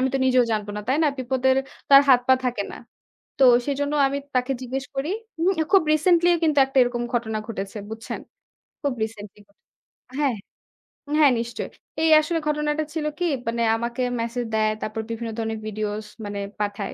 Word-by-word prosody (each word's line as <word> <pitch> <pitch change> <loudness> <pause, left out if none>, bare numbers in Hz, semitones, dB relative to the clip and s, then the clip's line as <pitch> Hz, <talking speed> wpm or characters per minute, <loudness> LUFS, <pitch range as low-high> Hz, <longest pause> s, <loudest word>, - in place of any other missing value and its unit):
আমি 265 - +2
তো 270 - +2
নিজেও 255 -1 +4
জানবো 210 -1 -2
না, 210 - -3
তাই 265 - +3
না? - - +4
বিপদের 260 +1 +1 0.3
তো - - -36
আর - - +5
হাত 250 -1 +7
পা 260 - +8
থাকে 240 -5 0
না। - - -8 0.6
তো 270 - +6 0.2
সেজন্য 285 +1 -1
আমি 280 +1 -1 0.2
তাকে 255 +1 +1
জিজ্ঞেস 265 +2 -4
করি। 285 +6 -1 0.3
উম 350 +3 +3 0.2
খুব 390 - +7
recently 345 +2 +4
কিন্তু 305 -3 +3
একটা 270 0 0
এরকম 245 -1 -1
ঘটনা 220 -2 -1
ঘটেছে 200 -1 -5
বুঝছেন? 225 0 -6 0.6
খুব 280 -3 0
recently 210 -2 -7
ঘটেছে। 200 - -34 0.6
হ্যাঁ, 275 -6 +1 0.8
হ্যাঁ, 290 -4 +6
নিশ্চয়ই। 235 0 -4 0.3
এই 320 - +4
আসলে 330 +2 -1
ঘটনাটা 300 0 0
ছিল 310 -2 -2
কি 355 - +1 0.2
মানে 235 0 -1 0.2
আমাকে 235 +2 -3 0.2
message 235 +1 -3
দেয়, 215 0 +2
তারপর 215 +1 -3
বিভিন্ন 230 0 -4
ধরনের 225 -1 -3
videos 215 0 -3 0.2
মানে 205 0 -4 0.2
পাঠায়, 205 -1 -3
245 Hz, 175 wpm, -24 LUFS, 220-285 Hz, 0.8 s, পা